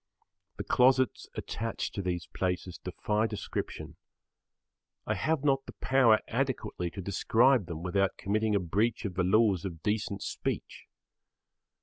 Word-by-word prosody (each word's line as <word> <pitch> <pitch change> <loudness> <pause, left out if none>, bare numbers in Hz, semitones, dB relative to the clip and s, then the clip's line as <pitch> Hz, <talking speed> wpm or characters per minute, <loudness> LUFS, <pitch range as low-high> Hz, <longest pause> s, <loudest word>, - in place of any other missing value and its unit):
The - - -3
closets 130 0 +3
attached 115 0 -4
to 100 - -3
these 90 -2 -2
places 90 -1 -2
defy 105 +4 -1
description. 105 -2 -5 1.1
I - - 0
have 155 -3 0
not 135 -2 +2
the - - -8
power 130 -5 +4
adequately 115 -8 -2
to 95 - -7
describe 115 +3 +3
them 85 0 -6
without 95 +2 +1
committing 105 +1 0
a - - +3
breach 105 +7 0
of 100 - -3
the 90 0 0
laws 100 -1 +3
of 85 -5 -6
decent 105 -1 -1
speech. - - -4
105 Hz, 135 wpm, -30 LUFS, 90-115 Hz, 1.1 s, power